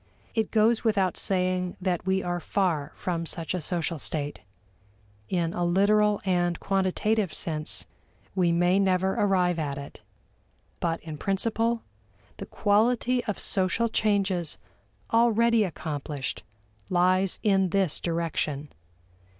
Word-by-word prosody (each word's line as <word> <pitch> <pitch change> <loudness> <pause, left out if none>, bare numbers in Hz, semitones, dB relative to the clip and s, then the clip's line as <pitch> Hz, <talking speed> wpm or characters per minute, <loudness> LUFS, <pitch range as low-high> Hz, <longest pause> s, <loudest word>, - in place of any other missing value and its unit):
It 220 -2 0
goes 225 +1 +3
without 200 -5 +1
saying 185 -1 0
that 180 -1 -2
we 190 0 +1
are 175 0 -2
far 170 -6 -1
from 170 -2 -3
such 165 +1 -2
a 180 - -2
social 165 0 -1
state; 145 0 -2 0.9
in 170 -2 0
a 175 - -1
literal 205 +4 +3
and 175 -2 +1
quantitative 195 +1 0
sense, 155 -2 0 0.5
we 180 -3 +2
may 175 +3 +3
never 190 -1 +2
arrive 180 -4 +2
at 140 -3 -3
it. 140 -4 -9 0.8
But 165 -1 -1
in 155 -2 -8
principle, 225 +5 0 0.5
the - - -7
quality 240 +4 +2
of 210 - -2
social 195 +5 +1
changes 195 -6 0 0.6
already 230 0 +4
accomplished 150 -5 -4 0.5
lies 185 +1 +2
in 195 -3 +3
this 190 -3 +1
direction. 160 -4 -2
185 Hz, 120 wpm, -27 LUFS, 170-205 Hz, 0.9 s, already